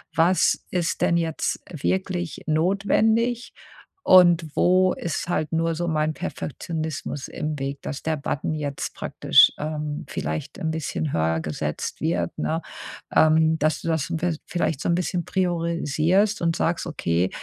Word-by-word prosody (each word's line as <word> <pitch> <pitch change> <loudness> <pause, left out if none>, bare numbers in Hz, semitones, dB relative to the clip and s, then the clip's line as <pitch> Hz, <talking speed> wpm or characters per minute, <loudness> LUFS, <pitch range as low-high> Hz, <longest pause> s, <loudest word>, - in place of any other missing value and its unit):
„Was 175 +3 +3
ist 175 -2 -1
denn 170 - +3
jetzt 165 -2 -1
wirklich 180 0 -2
notwendig, 215 +8 +1 0.5
und 175 -4 +5
wo 185 +1 +4
ist 170 -1 -3
halt 155 -3 -1
nur 165 0 +1
so 175 +1 -2
mein 155 0 0
Perfektionismus 155 -3 -5
im 150 -1 -4
Weg, 140 +1 -4
dass 145 - -6
der 160 0 0
Button 145 +2 -2
jetzt 145 -2 -4
praktisch, - - +4
ähm, 150 -1 -4
vielleicht 80 +1 -4
ein 160 - -1
bisschen 155 -1 -3
höher 80 0 +1
gesetzt 75 -2 -4
wird“, 85 0 -1
ne? 165 +1 -1 0.5
Ähm, 160 0 +4
dass 155 +1 +1
du - - -6
das 160 0 0
in 165 - -1
vi 175 -3 0
vielleicht 165 -4 -1
so - - -2
'n 170 - +3
bisschen 175 -1 -1
priorisierst 175 +2 +1
und 165 -1 +1
sagst: 170 +1 0
„Okay, 90 - 0
160 Hz, 150 wpm, -24 LUFS, 150-175 Hz, 0.5 s, und